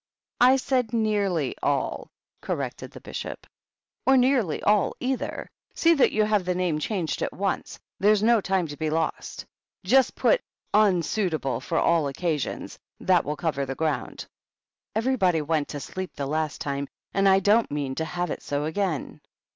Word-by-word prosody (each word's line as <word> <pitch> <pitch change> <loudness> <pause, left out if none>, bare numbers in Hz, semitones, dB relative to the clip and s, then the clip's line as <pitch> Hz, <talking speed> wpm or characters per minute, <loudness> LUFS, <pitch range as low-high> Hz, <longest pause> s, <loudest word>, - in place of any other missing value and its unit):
"I 255 +2 +7
said 255 -3 0
nearly 200 - +1
all," - - -1 0.3
corrected - - -4
the - - -12
Bishop. - - -7 0.3
" - - -61
Or 265 0 +6
nearly 250 - +2
all, 210 -1 +3
either. 260 0 -3 0.2
See 335 0 +4
that 280 - +4
you 215 - +2
have 210 -2 +2
the 180 0 -1
name 175 -4 0
changed 175 -1 -2
at - - -1
once; 195 0 -3 0.2
there's 210 +1 +4
no 230 -1 +4
time 190 -2 0
to 145 - -7
be 155 -1 -1
lost. 160 +1 -2 0.4
Just 255 +7 +3
put - - +3 0.2
* - - -48
equitable 180 -7 +1
for 165 - -2
all 165 -3 +3
Occasions 150 0 -3
;' - - -55
that 180 -3 +5
will 150 - -2
cover 155 -4 -1
the 135 0 -4
ground. 150 -6 -2 0.7
Everybody 205 -9 +2
went 155 -1 0
to 145 - -5
sleep 185 +7 -6
the 140 - -3
last 155 +1 -2
tftne, 140 0 -3 0.3
and 195 0 +4
I 190 0 +6
don't 210 +4 +3
.mean 145 -2 -2
to 160 +4 -2
have 175 0 -3
it - - -4
so 145 +1 -2
again." 160 -1 -2
180 Hz, 170 wpm, -25 LUFS, 155-215 Hz, 0.7 s, I